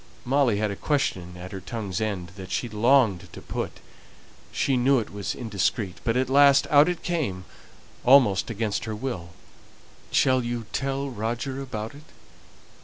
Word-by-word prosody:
Molly 130 -4 +2
had 105 0 0
a - - -4
question 95 - -1
at 90 +1 -8
her 95 - -6
tongue's 100 -5 -4
end 100 -5 -2
that 95 -2 -9
she 120 - -1
longed 115 -3 +2
to - - -8
put; - - -5 0.7
she 135 - +1
knew 130 +2 +4
it 110 -4 -3
was 100 -2 -3
indiscreet, 100 -5 -2
but 115 +1 +1
at 130 0 +1
last 140 +1 +6
out 145 +3 +6
it 175 -2 -4
came 130 - -2 0.6
almost 125 -8 +5
against 110 -1 -2
her 110 -1 -4
will: 105 -8 -5 0.8
"Shall 130 -1 +3
you 120 -1 -3
tell 135 0 -2
Roger 120 +4 -3
about 110 -4 -5
it?" 145 +2 -14
115 Hz, 160 wpm, -25 LUFS, 100-135 Hz, 0.8 s, last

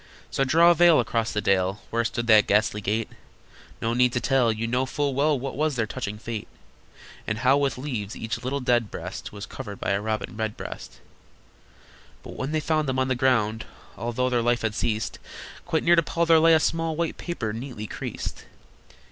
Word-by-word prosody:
So 135 - +1
draw 165 +6 +5
a - - +6
veil 170 -1 +6
across 115 -1 0
the 105 - -1
dale 95 0 +1
Where 115 +1 +1
stood 120 0 -2
that 110 -3 +6
ghastly 105 0 +2
gate. 110 +2 -1 0.8
No 115 +1 +1
need 125 0 +3
to 125 - +1
tell. 130 -3 +2
You 110 +1 -3
know 125 +3 0
full 145 +1 -1
well 145 +2 +2
What 135 +1 -5
was 150 0 0
their 115 -2 0
touching 105 0 -5
fate, 110 0 -6 0.8
And 105 - -1
how 130 +3 +4
with 140 -2 0
leaves 120 -7 -4
each 110 +1 -4
little 135 +3 -2
dead 120 -3 +2
breast - - -7
Was 100 -1 -7
covered 100 -1 -8
by - - -1
a 100 +1 +1
Robin 110 +1 -3
Redbreast! 110 -1 -6 1.2
But - - -9
when 135 +3 -3
they 155 - +1
found 155 -1 0
them 130 - -1
on 130 0 +1
the - - +3
ground, 115 -4 +1 0.3
Although 120 +2 -1
their 120 -1 +2
life 120 0 +1
had 110 -1 0
ceased, 110 0 -2 0.5
Quite 160 -3 0
near 175 +1 +5
to 165 - +5
Paul 170 +1 -1
there 165 -1 +6
lay 165 0 +6
a - - +4
small 165 0 0
White 165 0 -2
paper, 115 -12 -4
neatly 115 -2 -6
creased. - - -6
120 Hz, 200 wpm, -25 LUFS, 110-145 Hz, 1.2 s, a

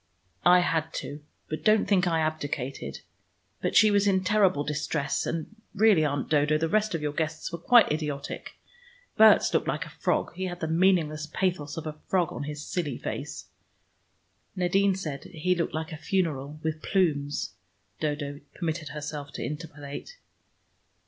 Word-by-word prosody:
"I 180 0 +7
had 160 -2 -1
to. 145 +1 -5 0.3
But 155 0 -5
don't 215 0 +4
think 190 -3 +3
I 165 -2 +2
abdicated. 145 -4 -3 0.6
But - - -1
she 215 +3 +7
was 205 0 +3
in 190 -1 +3
terrible 190 -7 +3
distress, 150 0 -1
and 165 +6 -4 0.2
really, 205 -5 +5
Aunt 145 -2 -1
Dodo, 150 0 +3
the 165 +1 0
rest 215 +2 +1
of 155 - -3
your 150 -1 -1
guests 160 0 -2
were 170 - -5
quite 240 +3 +6
idiotic. 150 -2 -4 0.6
Berts 220 0 +6
looked - - +1
like - - -1
a - - -11
frog; - - -1
he 185 +2 -3
had 175 -1 -5
the 160 - -2
meaningless 160 -3 +2
pathos 170 -5 -1
of 160 - -5
a 155 -1 -6
frog 180 -4 +1
on 145 - -4
his 150 0 -6
silly 150 -8 -2
face - - -5 0.6
" - - -43
"Nadine 190 +2 +2
said 150 -7 -5
he 180 +2 0
looked 170 -3 -2
like 160 +1 -3
a 155 - -5
funeral 155 -4 -1
with 155 0 -2
plumes," 145 -7 0 0.5
Dodo 145 -2 -2 0.2
permitted 160 -3 -3
herself 150 -1 -6
to - - -4
interpolate. 150 - -7
160 Hz, 165 wpm, -27 LUFS, 150-185 Hz, 0.6 s, I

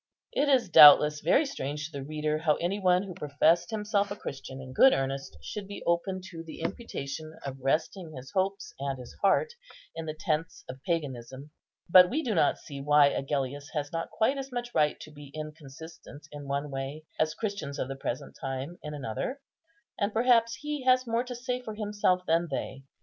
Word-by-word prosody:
It 285 +1 +2
is 255 -5 +4
doubtless 150 -2 +9
very 225 - +3
strange 150 - -4
to 160 - -8
the 140 -2 -6
reader 155 +1 -2
how 155 -2 +2
any 185 +4 -2
one 185 -1 +3
who 195 -2 -7
professed 160 +2 +2
himself 210 -2 0
a 205 - -4
Christian 135 -7 -7
in 130 -1 -9
good 265 - +7
earnest 135 - -3
should 200 - -6
be 200 - -8
open 185 +2 0
to 165 -2 -7
the 165 - -10
imputation 155 - -5
of 135 -1 -5
resting 155 +5 -1
his 130 +1 -9
hopes 195 +1 -1
and 135 -1 -2
his 125 -2 -10
heart 460 - +3 0.4
in 165 -1 -5
the 155 - -4
tents 155 0 -2
of 130 +1 -9
paganism; 135 -4 -3 0.4
but 180 +1 +8
we 310 +5 -1
do 230 - -1
not 160 -6 +3
see 140 -1 -9
why 145 0 +5
Agellius 140 0 -3
has 145 -1 -2
not 165 0 -3
quite 265 +5 +1
as 270 0 -6
much 240 -1 -4
right 150 -1 +2
to 155 - -10
be 145 -1 -12
inconsistent 155 0 -10
in 145 -1 -8
one 140 +1 -2
way 135 +3 -5 0.2
as 155 0 +1
Christians 200 -10 -4
of - - -2
the 135 - -5
present 130 -2 -5
time 135 +5 -4
in 150 0 -6
another, 140 - -4 0.6
and 200 +1 +1
perhaps 230 +1 +3
he 295 0 -4
has 255 0 +4
more 230 +1 0
to 250 -1 -7
say 250 +1 -3
for 220 -3 -7
himself 205 -4 +1
than 165 +1 +2
they. 135 -1 -4
160 Hz, 195 wpm, -29 LUFS, 140-205 Hz, 0.6 s, doubtless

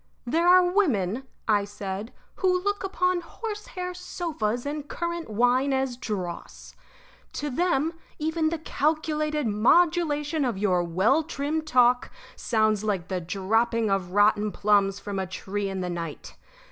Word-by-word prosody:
"There 330 +8 +1
are 365 +1 +7
women," 265 - +1 0.2
I 210 -2 +3
said, 200 +1 -6 0.3
"who 375 -2 +2
look 405 0 -1
upon 365 -2 0
horsehair 375 -1 -6
sofas 285 -10 -3
and 290 0 -4
currant 340 -3 -4
wine 245 +5 +2
as 265 -2 0
dross. 195 -8 -6 0.6
To 295 -1 -3
them 325 +1 +1 0.2
even 315 +1 0
the 335 - -2
calculated 305 -1 -1
modulation 300 - +2
of 240 -6 -1
your 185 -3 +2
well 190 - +2
trimmed 310 0 -3
talk 245 -2 +4 0.3
sounds 215 -2 +1
like 195 -5 -2
the 185 -2 -2
dropping 220 +5 0
of 190 -2 0
rotten 210 +1 +3
plums 200 -1 +2
from 200 -1 -4
a 190 - -2
tree 195 +2 -4
in 190 -1 -3
the 180 - -2
night. 165 -3 -6
245 Hz, 140 wpm, -26 LUFS, 205-320 Hz, 0.6 s, are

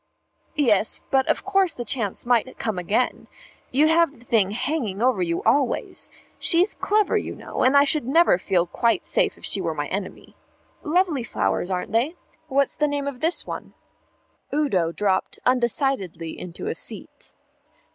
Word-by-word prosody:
"Yes, 225 -8 +2
but 265 -1 +2
of - - 0
course 390 -2 +2
the 240 - -5
chance 225 -6 -2
might 245 +1 +1
come 215 -5 -2
again. 210 +8 -1 0.4
You'd 295 +5 +3
have 325 -3 +3
the 235 - -19
thing 215 -5 +2
hanging 225 -2 -2
over 245 -4 +2
you 170 -1 -1
always. 275 -4 0 0.3
She's 360 +3 +3
clever, 420 0 +1
you - - -6
know; - - -5
and 265 +2 +5
I 280 - +7
should 285 -3 0
never 320 - +4
feel 180 -2 +1
quite 230 +6 0
safe - - 0
if - - -9
she - - +1
were - - -2
my - - -2
enemy.... - - -6 0.5
Lovely 325 -4 +1
flowers, 100 - -1
aren't 180 -1 -3
they? 245 +10 +1 0.3
What's 280 -1 +1
the 300 - +1
name 285 -1 -2
of 280 -3 -5
this 330 +5 +1
one?" - - -7 0.8
Udo 200 - +1
dropped 190 +1 -1
undecidedly 235 - 0
into 175 -1 -8
a - - -1
seat. - - -7
250 Hz, 165 wpm, -23 LUFS, 200-295 Hz, 0.8 s, I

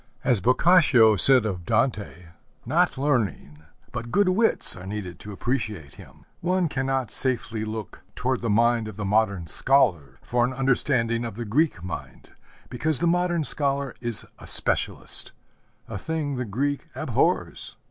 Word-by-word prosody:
As 125 -5 +2
Boccaccio 130 - +5
said 130 +3 +5
of 90 -5 -3
Dante, 110 -5 -1 0.4
not 165 +5 +1
learning 115 - -1 0.3
but 120 -1 -6
good 205 -2 +3
wits 220 +5 +2
are 90 +1 -10
needed 100 -4 -6
to 105 - -9
appreciate 105 - -4
him. - - -16
One 180 0 0
cannot 135 -3 -2
safely 115 -4 +1
look 110 -1 -7
toward 130 0 -1
the 115 - -2
mind 115 +1 +2
of 110 - -8
the 105 0 -5
modern 100 -3 +1
scholar 90 - +2
for 120 0 0
an 125 +2 -1
understanding 125 -3 0
of 115 -4 -6
the 120 +1 -5
Greek 125 - 0
mind, 90 -2 -8 0.4
because 150 +4 -1
the - - 0
modern 175 -1 +1
scholar 140 -2 -1
is 120 -4 0
a - - -11
specialist - - 0 0.5
a 100 - -6
thing 150 +1 -3
the 125 -1 -3
Greek 140 +7 -2
abhors. - - -1
120 Hz, 150 wpm, -24 LUFS, 105-140 Hz, 0.5 s, Boccaccio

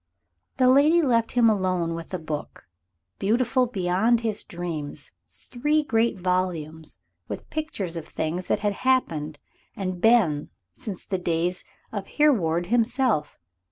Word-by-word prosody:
The 255 -1 +4
lady 285 +6 +6
left 230 -4 +2
him 240 -2 +5
alone 185 -5 +1
with 165 0 -7
a 185 - -1
book, 155 -3 -6 0.5
beautiful 245 +5 +2
beyond 220 +2 +1
his 220 -3 -2
dreams 170 -4 -5 0.2
three 295 +5 -1
great 230 -5 +1
volumes 175 - -2 0.3
with - - -7
pictures 300 - -3
of 165 -1 -6
things 170 +3 -3
that - - 0
had 205 -1 +1
happened 165 - 0 0.4
and 185 -2 -4
been 195 -11 +3 0.2
since 215 -8 -7
the 190 -2 -2
days 175 +1 -1 0.3
of 200 -3 -5
Hereward 180 - +3
himself. 240 - +1
195 Hz, 130 wpm, -25 LUFS, 170-240 Hz, 0.5 s, lady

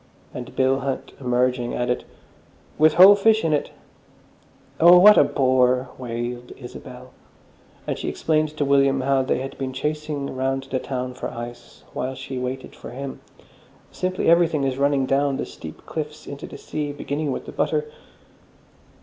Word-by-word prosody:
And 125 -1 -8
Bill 135 +1 +2
Hunt, 135 0 -4
emerging, 125 -1 0
added, 125 0 -1 0.7
"With 155 0 +5
whole 190 +3 +10
fish 220 0 +3
in 160 - +2
it." 145 - 0 1.1
"Oh, 175 +2 +8
what 210 +4 +9
a - - +7
bore!" 130 -1 +2
wailed 120 0 -5
Isabel. 125 0 -11 0.7
And - - -3
she - - -3
explained 155 -1 0
to 145 - +1
William 140 -1 +3
how 135 0 +2
they 130 -1 -1
had 135 - -6
been 130 -1 -3
chasing 150 0 -3
round 135 +1 -1
the 130 - 0
town 125 -1 -4
for 125 - -5
ice 120 +1 -9
while 130 +1 -3
she 130 0 -6
waited 125 +1 -5
for - - -10
him. 135 +2 -7 0.7
"Simply 185 0 -2
everything 165 -3 +4
is 135 0 -1
running 140 -1 +2
down 135 +1 +1
the - - -3
steep - - -11
cliffs 150 -1 -6
into 140 0 -8
the - - -10
sea, 150 -1 -4
beginning 145 +1 -3
with - - -5
the - - -8
butter." 455 - 0
135 Hz, 160 wpm, -23 LUFS, 130-150 Hz, 1.1 s, whole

